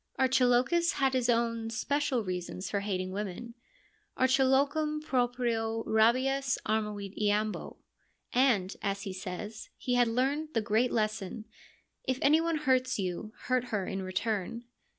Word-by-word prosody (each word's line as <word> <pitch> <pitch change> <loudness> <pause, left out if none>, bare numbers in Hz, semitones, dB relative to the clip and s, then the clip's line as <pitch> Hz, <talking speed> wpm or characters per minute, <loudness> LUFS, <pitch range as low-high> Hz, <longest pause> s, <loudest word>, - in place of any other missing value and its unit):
Archilochus 260 +6 +3
has 270 -1 +1
his 250 -2 +1
own 230 -1 +1
special 260 +1 0
reasons 180 0 -4
for 200 - +1
hating 185 -2 -2
women 210 +4 -5 0.2
— - - -33
' - - -37
Archilochum 280 +4 +3
proprio 240 -5 0
rabies 260 +5 +2
armavit 210 -2 -2
iam 210 +1 +2
bo - - -8 0.2
' - - -41
— - - -25 0.2
and, 195 -5 0
as 200 -1 -2
he 195 -3 -5
says, 200 +3 -6
he 250 - -2
had 245 -1 +4
learned 275 +6 -1
the - - +4
great 220 +4 +1
lesson, 215 -1 -2 0.3
' - - -41
If 260 - -1
anyone 320 +3 +4
hurts 255 -1 +2
you, 190 +2 -3
hurt 255 0 +1
her 210 -6 -2
in 195 +1 -3
return.' 210 +4 -2
230 Hz, 150 wpm, -30 LUFS, 210-260 Hz, 0.3 s, had